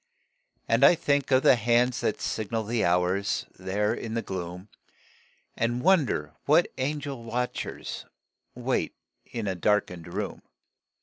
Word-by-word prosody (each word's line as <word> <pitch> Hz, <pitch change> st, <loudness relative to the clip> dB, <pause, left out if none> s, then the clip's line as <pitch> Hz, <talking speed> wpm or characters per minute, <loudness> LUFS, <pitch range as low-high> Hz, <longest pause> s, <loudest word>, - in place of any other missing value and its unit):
And 115 Hz, +3 st, +3 dB
I 155 Hz, -, +8 dB
think 145 Hz, -3 st, +1 dB
of 130 Hz, -1 st, +4 dB
the -, -, +7 dB
hands 120 Hz, +2 st, +2 dB
that 105 Hz, -, 0 dB
signal 110 Hz, +1 st, -2 dB
The 115 Hz, +2 st, 0 dB
hours 90 Hz, +3 st, +1 dB
there 100 Hz, +3 st, 0 dB
in 115 Hz, -1 st, -5 dB
the 115 Hz, -, -1 dB
gloom, 90 Hz, 0 st, -6 dB, 0.9 s
And 120 Hz, +2 st, -1 dB
wonder 155 Hz, -, +2 dB
what -, -, +4 dB
angel 140 Hz, -2 st, -3 dB
watchers 125 Hz, +2 st, -4 dB, 0.5 s
Wait -, -, -1 dB, 0.3 s
in 115 Hz, -3 st, -4 dB
the 95 Hz, -, 0 dB
darkened 90 Hz, -3 st, 0 dB
room. 100 Hz, +2 st, -4 dB
115 Hz, 130 wpm, -27 LUFS, 95-125 Hz, 0.9 s, I